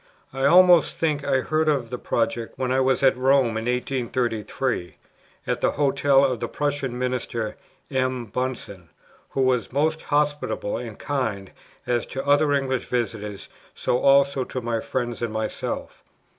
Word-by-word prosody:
I 135 Hz, 0 st, -1 dB
almost 180 Hz, 0 st, +6 dB
think 150 Hz, -3 st, 0 dB
I 130 Hz, -, +1 dB
heard 155 Hz, +2 st, +1 dB
of 130 Hz, -6 st, 0 dB
the 125 Hz, -, -4 dB
project, 115 Hz, 0 st, -2 dB
when 130 Hz, -1 st, -1 dB
I 130 Hz, -, +2 dB
was 130 Hz, 0 st, +2 dB
at 135 Hz, -, +5 dB
Rome 130 Hz, 0 st, +3 dB
in 110 Hz, 0 st, -3 dB
1833, 125 Hz, -4 st, -2 dB, 0.5 s
at -, -, -2 dB
the -, -, +2 dB
Hotel 140 Hz, -1 st, +3 dB
of 130 Hz, -3 st, -1 dB
the -, -, -2 dB
Prussian 140 Hz, -4 st, -2 dB
Minister, 125 Hz, -3 st, -2 dB, 0.4 s
M. 130 Hz, -2 st, -1 dB
Bunsen, 110 Hz, -7 st, -5 dB, 0.4 s
who 135 Hz, -, 0 dB
was 125 Hz, -3 st, +1 dB
most 155 Hz, +4 st, 0 dB
hospitable 145 Hz, -7 st, -1 dB
and 115 Hz, -4 st, -7 dB
kind, 110 Hz, -9 st, -3 dB, 0.3 s
as 120 Hz, -1 st, 0 dB
to 135 Hz, -, -5 dB
other 145 Hz, +1 st, +4 dB
English 135 Hz, -3 st, 0 dB
visitors, 110 Hz, -4 st, -3 dB, 0.3 s
so 125 Hz, -, 0 dB
also 140 Hz, -1 st, +4 dB
to 130 Hz, -, -5 dB
my 115 Hz, -2 st, -2 dB
friends 120 Hz, 0 st, -3 dB
and 120 Hz, -2 st, -2 dB
myself. 110 Hz, 0 st, -4 dB
130 Hz, 155 wpm, -24 LUFS, 120-140 Hz, 0.5 s, almost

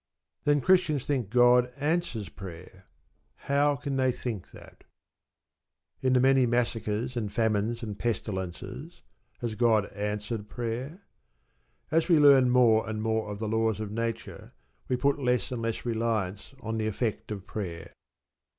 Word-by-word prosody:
Then 145 Hz, -1 st, +3 dB
Christians 160 Hz, -7 st, +3 dB
think 130 Hz, -8 st, -1 dB
God 125 Hz, +1 st, +5 dB
answers 150 Hz, -, -1 dB
prayer. 95 Hz, 0 st, -11 dB, 0.5 s
How 145 Hz, +1 st, +1 dB
can 140 Hz, -1 st, -3 dB
they 130 Hz, -1 st, +3 dB
think 115 Hz, -6 st, -5 dB
that? -, -, -15 dB, 1.2 s
In 130 Hz, -1 st, +2 dB
the 125 Hz, -, +5 dB
many 130 Hz, 0 st, +4 dB
massacres, 120 Hz, 0 st, -1 dB
and 110 Hz, -4 st, -2 dB
famines, 110 Hz, +1 st, 0 dB
and 105 Hz, -3 st, -6 dB
pestilences 105 Hz, -, -4 dB, 0.4 s
has 120 Hz, -2 st, -2 dB
God 110 Hz, -2 st, +3 dB
answered 105 Hz, +1 st, -4 dB
prayer? 125 Hz, -, -5 dB, 0.9 s
As 165 Hz, +3 st, +2 dB
we 170 Hz, -, +6 dB
learn 140 Hz, -4 st, +7 dB
more 115 Hz, -3 st, +4 dB
and 110 Hz, 0 st, -3 dB
more 110 Hz, -1 st, 0 dB
of 105 Hz, -, -5 dB
the 110 Hz, +1 st, -3 dB
laws 110 Hz, -1 st, +1 dB
of 105 Hz, -2 st, -4 dB
Nature 115 Hz, +1 st, -4 dB, 0.3 s
we 125 Hz, -, +1 dB
put 140 Hz, +3 st, +1 dB
less 125 Hz, -1 st, 0 dB
and 120 Hz, -2 st, -3 dB
less 115 Hz, +1 st, -3 dB
reliance 110 Hz, -1 st, -2 dB
on 110 Hz, -1 st, -3 dB
the 110 Hz, -, 0 dB
effect 110 Hz, 0 st, -2 dB
of 100 Hz, -3 st, -6 dB
prayer. 90 Hz, -6 st, -6 dB
115 Hz, 145 wpm, -28 LUFS, 105-130 Hz, 1.2 s, learn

